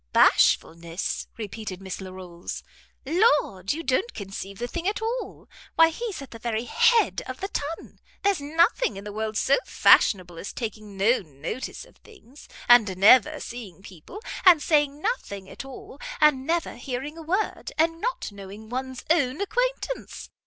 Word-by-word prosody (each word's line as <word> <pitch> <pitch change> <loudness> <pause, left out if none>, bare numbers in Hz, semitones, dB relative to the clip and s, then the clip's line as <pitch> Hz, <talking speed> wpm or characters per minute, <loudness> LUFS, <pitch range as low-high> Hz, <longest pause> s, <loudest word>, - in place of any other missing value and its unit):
"Bashfulness," 170 +2 +2
repeated 215 -3 -6
Miss 190 0 -6
Larolles; 185 -2 -8 0.4
"Lord, 290 - +2
you 325 +3 -3
don't 330 - 0
conceive 195 -1 -7
the 240 - -3
thing 345 +6 -4
at 410 - 0
all. 460 +3 -4 0.3
Why 325 0 +7
he's 400 -2 -5
at 275 - -13
the 230 - -9
very 225 0 -2
head 470 - +3
of - - -6
the 390 - -4
ton. 310 0 -5 0.2
There's 395 -6 +2
nothing 330 - +2
in 195 - -8
the 205 0 -7
world 215 0 -3
so 270 - +3
fashionable 180 -4 +4
as 200 - -6
taking 215 -3 -6
no 220 +6 +3
notice 155 - -6
of - - -22
things, 300 - -17 0.2
and 220 -6 +6
never 215 +4 +6
seeing 210 -6 -8
people, 200 - -11 0.2
and 355 -4 +8
saying 295 -1 +1
nothing 200 - -3
at - - -8
all, 270 +1 -11 0.2
and 300 -3 +4
never 335 -4 -1
hearing 265 +4 -5
a 330 - -9
word, 375 +7 -2
and 330 +1 +1
not - - -2
knowing 200 +2 -11
one's 260 +1 -5
own 285 -4 +2
acquaintance. - - -2
255 Hz, 160 wpm, -25 LUFS, 200-330 Hz, 0.4 s, and